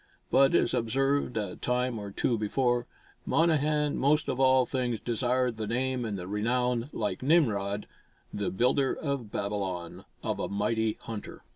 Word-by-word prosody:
But, 135 +4 +5
as - - +3
observed 135 +2 +1
a 105 -4 -3
time 125 -1 -1
or 100 -1 -6
two 115 +4 0
before, 120 +3 0 0.4
Monnehan 150 -2 +2
most 150 +3 +2
of 130 - -2
all 130 -1 +5
things 125 -4 -1
desired 125 0 0
the 110 -1 -3
name 125 +1 -1
and 105 -3 -3
the 90 -1 -6
renown, 120 +4 0
like - - -2
Nimrod, 105 -10 +2 0.5
the 100 - -1
builder 130 +6 +2
of 140 -8 -3
Babylon, 95 -4 -3 0.2
of - - -2
a - - -2
"mighty 110 +2 0
hunter." 110 -3 -7
120 Hz, 150 wpm, -29 LUFS, 105-130 Hz, 0.5 s, But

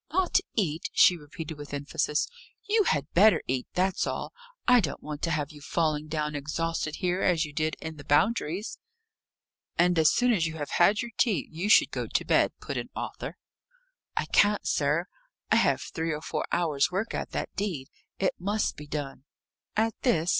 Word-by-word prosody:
"Not 370 +2 +3 0.2
eat!" 165 -7 0
she 180 - +6
repeated 155 0 -8
with 145 0 -6
emphasis. 150 +1 -1 0.4
"You 425 0 +3
had 145 - 0
better 210 +5 +6
eat 130 0 -2
that's 185 0 +1
all. - - -4 0.3
I 250 0 +7
don't 155 -10 -3
want 150 -1 -6
to 170 - 0
have 150 -3 -1
you 150 -1 -13
falling 155 0 0
down 150 -1 -2
exhausted 155 +2 -2
here, 180 0 -1
as 170 -3 +2
you 150 - -10
did 155 +1 0
in 160 -1 -7
the 145 - -10
Boundaries." 185 - +1 1.0
"And 175 0 +4
as 155 - +6
soon 245 0 +3
as 165 -6 +1
you 160 - -6
have 145 -2 -5
had 205 +6 +4
your 240 - -7
tea, 210 - +2
you 170 +6 -3
should - - +6
go - - -3
to - - -1
bed," - - +3
put - - -5
in - - -4
Arthur. - - -5 0.8
"I - - +1
can't, 205 0 +3
sir. - - +1 0.5
I - - +6
have - - +2
three 160 0 -3
or 150 0 -3
four - - -2
hours' 155 -5 +2
work 195 +5 -2
at - - -3
that - - -3
deed. 180 -10 -3 0.3
It 190 - +1
must 205 +4 0
be 150 - -9
done." 145 -3 -5 0.5
"At 225 +1 +2
this?" 175 -10 +2
165 Hz, 190 wpm, -28 LUFS, 150-195 Hz, 1.0 s, I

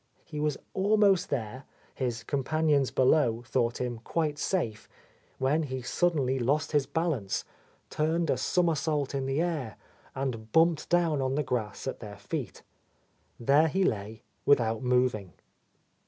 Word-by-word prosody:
He 150 - -6
was 150 -1 0 0.2
almost 200 -1 +3
there, 125 +2 -4 0.3
his 120 -3 -3
companions 145 0 +1
below 125 -3 +2
thought 120 0 0
him 120 -2 -3
quite 150 +4 -2
safe, 115 - -2 0.5
when 135 +5 +1
he 130 -4 -4
suddenly 135 -4 +1
lost 145 +5 0
his 145 -3 +2
A - - -26
Lost - - -36
Lady 165 +1 +2
balance, 100 -9 -3 0.5
turned 160 +1 0
a - - +1
somersault 155 -5 0
in 135 -1 -2
the 135 +2 0
air, 155 -10 -3 0.4
and 115 -5 -4
bumped 165 +1 +3
down 170 -5 +2
on 130 0 0
the 150 - +1
grass 110 -5 -3
at 130 - -4
their 105 -2 -9
feet. 100 0 -5 0.8
There 140 +6 +4
he 190 +4 +1
lay 110 - -2 0.2
without 115 -6 +3
moving. 125 -8 +1
135 Hz, 150 wpm, -29 LUFS, 120-155 Hz, 0.8 s, There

